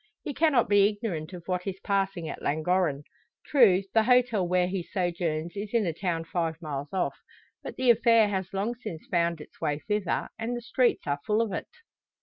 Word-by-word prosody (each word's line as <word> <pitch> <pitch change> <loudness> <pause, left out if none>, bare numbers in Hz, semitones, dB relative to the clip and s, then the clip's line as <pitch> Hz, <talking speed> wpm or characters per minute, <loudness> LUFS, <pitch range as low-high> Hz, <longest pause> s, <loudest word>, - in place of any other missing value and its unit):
He 285 - -4
cannot 290 -6 +3
be 205 0 +5
ignorant 205 -7 -4
of 180 -2 -9
what 180 0 -2
is 190 -1 -4
passing 195 -4 -1
at - - -6
Llangorren. 155 -1 0 0.4
True, 205 -10 +5
the 225 - +5
hotel 240 -5 +3
where 180 0 +2
he 185 0 -2
sojourns 170 -2 -2
is 205 +3 -5
in 225 -3 +3
a 170 - -1
town 170 -1 -2
five 165 -2 -2
miles 145 -3 -5
off; 190 - -1 0.4
but - - -7
the 255 -2 +4
affair 230 -1 +5
has 190 -3 -3
long 200 +4 -1
since 215 -9 -8
found 170 -1 +1
its 150 - -14
way 150 -3 0
thither, 210 +3 -2
and 235 +2 -2
the - - -6
streets 245 +1 +1
are 145 -1 -1
full 215 +1 +2
of 225 -4 0
it. - - -4
190 Hz, 195 wpm, -27 LUFS, 170-220 Hz, 0.4 s, be